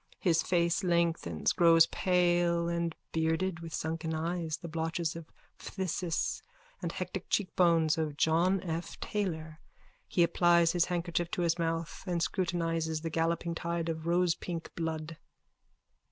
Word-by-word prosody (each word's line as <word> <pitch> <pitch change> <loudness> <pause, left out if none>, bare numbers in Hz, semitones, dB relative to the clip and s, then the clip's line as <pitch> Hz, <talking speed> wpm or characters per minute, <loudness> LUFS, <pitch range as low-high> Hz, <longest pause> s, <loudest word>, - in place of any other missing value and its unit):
His 165 -4 +3
face 170 -1 +1
lengthens, 170 - +1
grows 165 -1 +6
pale 175 -2 +2
and 170 -1 -1 0.2
bearded, 165 +2 0
with 165 -1 -8
sunken 160 +1 -3
eyes, 165 0 -2
the 170 - -8
blotches 165 0 -2
of 165 -1 -9 0.3
phthisis 180 -3 -2 0.4
and - - -2
hectic - - -5
cheekbones 170 -5 +2
of 150 -2 -2
John 175 +5 +3
F. 170 -1 -5
Taylor. 160 -6 -3 0.5
He 175 - +3
applies 170 -1 +4
his 175 -1 +2
handkerchief 175 -1 -1
to 175 - -1
his 170 0 +1
mouth 165 -1 -2
and 175 -1 0
scrutinises 165 -3 -1
the 165 - -3
galloping 165 +1 0
tide 170 0 -2
of 160 0 -4
rosepink 175 -1 0
blood.) 160 -1 -4
170 Hz, 135 wpm, -31 LUFS, 160-175 Hz, 0.5 s, grows